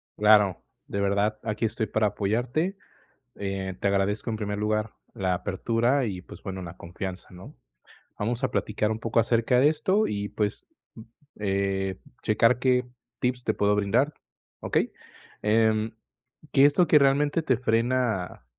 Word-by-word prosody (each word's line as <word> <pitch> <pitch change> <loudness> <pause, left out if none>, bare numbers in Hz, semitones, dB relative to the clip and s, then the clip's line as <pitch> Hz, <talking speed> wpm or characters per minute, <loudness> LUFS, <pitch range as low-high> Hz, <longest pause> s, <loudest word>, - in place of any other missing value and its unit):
Claro, 105 -3 +4 0.2
de 100 - -3
verdad. 100 +2 +1
Aquí 110 +1 -1
estoy 110 0 -1
para 110 +1 +1
apoyarte, 120 - -1 0.6
eh, 95 -1 -3
te 100 - +1
agradezco 100 +3 0
en 110 - -2
primer 105 -1 -3
lugar 105 0 -1 0.2
la 95 -2 -1
apertura 115 +9 0
y 95 -5 -4
pues - - -13
bueno, 95 -1 -5
la 85 +1 -8
confianza, 90 +2 -7
¿no?, 95 +11 -12 0.7
vamos 120 +5 -2
a 130 - +1
platicar 105 -1 -1
un 110 - -3
poco 115 0 +1
acerca 115 +2 +2
de 145 - +6
esto 190 +7 +1
y, 100 0 -3
pues, 105 -1 -3 0.7
eh, 95 -1 -1 0.2
checar 115 +3 +3
qué 125 -1 +2 0.3
tips 125 0 -1
te 110 - +1
puedo 105 0 +2
brindar, 115 +9 +1 0.5
¿okey?, - - 0 0.5
em, 110 0 +2 0.6
¿qué 140 0 +6
es 145 - +3
lo 180 - +6
que 150 - +6
realmente 145 +3 +3
te 130 -5 +2
frena? 115 - 0
110 Hz, 150 wpm, -26 LUFS, 100-125 Hz, 0.7 s, de